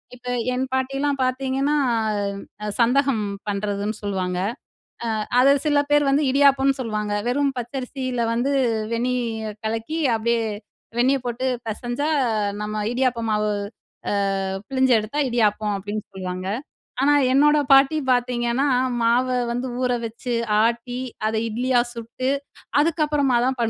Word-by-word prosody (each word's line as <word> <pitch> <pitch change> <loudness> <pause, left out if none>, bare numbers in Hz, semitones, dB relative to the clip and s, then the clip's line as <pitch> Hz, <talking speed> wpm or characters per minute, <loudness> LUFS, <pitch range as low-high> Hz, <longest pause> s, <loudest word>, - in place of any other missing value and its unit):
இப்ப 250 0 -14 0.3
என் 255 +1 0
பாட்டிலாம் 275 +2 0
பாத்தீங்கன்னா, 265 +2 0 0.9
அ - - -2
சந்தகம் 250 -2 +3 0.2
பண்றதுன்னு 205 +1 -2
சொல்லுவாங்க. 185 -3 -2 0.8
அ - - -1 0.2
அத 275 +2 +6
சில 290 -1 +4
பேர் 290 -1 +4
வந்து 285 +2 +3
இடியாப்பம்னு 275 -1 +4
சொல்லுவாங்க. 210 -3 -2 0.2
வெறும் 275 +1 +1
பச்சரிசியில 250 0 -3
வந்து 255 +5 0 0.4
வெண்ணிய 230 -3 -2
கலக்கி 225 +9 -2 0.2
அப்டியே 235 +1 +1 0.6
வெந்நீ 255 +3 +4
போட்டு 245 +2 -2 0.2
பெசஞ்சா 240 +5 -3 0.6
நம்ம 210 0 -4 0.2
இடியாப்பம் 245 -2 0
மாவு 210 0 +1 0.6
அ - - 0 0.5
பிழிஞ்சு 260 -1 +3
எடுத்தா 220 +8 -4
"இடியாப்பம்" 215 -3 +1
அப்டின்னு 205 +2 -4
சொல்வாங்க. 185 0 -4 0.5
ஆனா 290 +2 +4 0.2
என்னோட 295 +2 +5
பாட்டி 275 +3 +6
பாத்தீங்கன்னா, 245 +1 +1 0.4
மாவ 240 +3 +3 0.2
வந்து 245 +2 -2
ஊற 250 - +1
வச்சு, 235 +2 -5 0.3
ஆட்டி, 235 +1 -1 0.3
அத 220 - -1
இட்லியா 245 +3 +1
சுட்டு, 235 +2 -4 0.5
அதுக்கப்புறமா 295 -4 +2
தான் 265 0 0
245 Hz, 120 wpm, -23 LUFS, 225-270 Hz, 0.9 s, அத